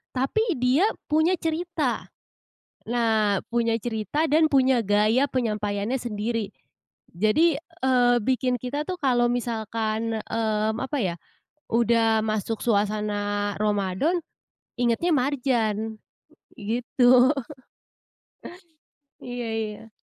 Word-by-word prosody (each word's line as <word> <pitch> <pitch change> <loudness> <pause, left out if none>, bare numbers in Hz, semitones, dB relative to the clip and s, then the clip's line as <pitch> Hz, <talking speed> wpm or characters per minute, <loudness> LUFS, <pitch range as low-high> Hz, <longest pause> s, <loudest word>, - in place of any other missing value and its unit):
Tapi 365 - 0
dia 255 - +3 0.2
punya 315 +4 +3
cerita. 325 -5 -2 0.8
Nah 220 -4 +2 0.2
punya 230 -1 +1
cerita 230 - -2
dan 315 +1 +3
punya 260 -3 +3
gaya 215 +6 +2
penyampaiannya 210 0 -1
sendiri. 220 -2 -3 0.6
Jadi, 215 - +3
eee, 260 -8 +1
bikin 255 +1 +1
kita 285 +4 -3
tuh 365 - -2
kalau 245 -3 +2
misalkan, 225 -1 -2
mmm, 220 -1 0
apa 265 +2 -3
ya 180 -5 -1 0.6
udah 225 -1 +3
masuk 215 0 -2
suasana 205 -1 0
Ramadan 210 - 0 0.6
ingetnya 245 +9 +1
Marjan, 240 -5 0 0.6
gitu. 245 +3 +3 1.9
Iya 245 -1 -5
iya. 220 0 -5
235 Hz, 95 wpm, -25 LUFS, 215-265 Hz, 1.9 s, dia